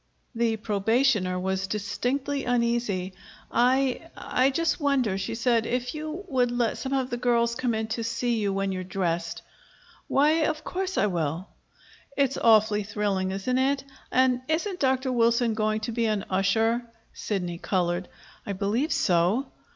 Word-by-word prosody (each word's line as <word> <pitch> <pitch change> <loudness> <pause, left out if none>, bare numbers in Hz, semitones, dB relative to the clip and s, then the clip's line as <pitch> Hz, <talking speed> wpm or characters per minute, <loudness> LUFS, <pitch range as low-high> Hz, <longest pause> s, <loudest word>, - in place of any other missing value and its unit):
The 230 -1 +1
probationer 215 -2 +1
was 190 +1 -1
distinctly 260 +7 -2
uneasy. 235 -6 0 0.4
"I 260 +5 +2
I 255 +2 +1
just 330 +5 0
wonder," 270 -9 +1
she 195 +3 -3
said, 230 -1 +1
"if 250 +1 -2
you 310 +5 -5
would 255 -6 +2
let 240 -2 0
some 265 - -4
of 265 -1 0
the 240 - -1
girls 235 -1 +2
come 235 -1 -1
in 220 0 -1
to 230 +1 -2
see 230 0 -1
you 205 -2 0
when 195 0 -1
you're 185 -1 -3
dressed?" 175 -3 -2 0.6
"Why, 305 +3 +3
of 310 -1 -3
course 380 0 -3
I - - +3
will." 170 -1 -2 0.7
"It's 275 -3 +2
awfully 215 -2 +4
thrilling, 200 -2 -1
isn't 195 +7 -1
it? 270 +1 +1 0.3
And 255 -1 +3
isn't 360 +4 -1
Dr. 260 -1 +1
Wilson 235 -1 +2
going 215 0 0
to 225 - -3
be 230 0 0
an 210 -2 -1
usher?" 220 +5 +2 0.3
Sidney 175 -5 -3
colored. 175 -1 -1 0.4
"I 200 - -4
believe 215 - 0
so." 185 +9 +2
230 Hz, 155 wpm, -26 LUFS, 195-260 Hz, 0.7 s, awfully